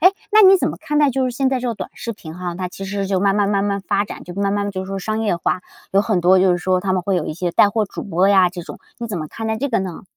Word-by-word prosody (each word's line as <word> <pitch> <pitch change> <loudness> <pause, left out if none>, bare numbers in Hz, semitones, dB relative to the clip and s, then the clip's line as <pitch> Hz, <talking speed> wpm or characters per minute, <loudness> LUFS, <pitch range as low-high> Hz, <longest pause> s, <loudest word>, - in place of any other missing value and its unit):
诶， 365 - +8 0.2
那 430 0 +7
你 385 -1 +8
怎 - - 0
么 - - -5
看 295 0 -1
待 290 -2 +4
就 260 -1 0
现 260 +2 0
在 260 -2 0
这 250 - -2
个 235 - -2
短 - - -5
视 230 - -5
频 165 -4 -11
哈， 175 -1 -5
它 185 0 -3
其 195 +2 -8
实 195 0 -3
就 190 -1 0
慢 200 0 +2
慢 200 -1 +2
慢 200 -1 +1
慢 200 -1 -1
发 200 +1 0
展， - - -9
就 175 - -9
慢 200 0 0
慢 205 0 -1
就 185 - -3
是 - - -10
说 195 0 -3
商 215 +3 -2
业 205 -6 0
化， 180 +1 -1 0.3
有 195 +1 +4
很 210 -5 0
多 185 +2 +5
就 190 0 +4
是 175 - +2
说 185 +2 +1
它 190 0 -1
们 185 -1 0
会 195 0 0
有 175 -4 0
一 - - -3
些 175 0 -2
带 205 - +5
货 220 0 +1
主 - - -7
播 185 0 +1
呀 190 -3 +5
这 175 -1 -7
种， - - -10 0.2
你 235 - -4
怎 215 -4 -4
么 155 -2 -5
看 225 +7 -6
待 220 - -1
这 280 +6 -2
个 230 - +1
呢？ 185 -3 -5
200 Hz, 365 characters per minute, -20 LUFS, 185-220 Hz, 0.3 s, 诶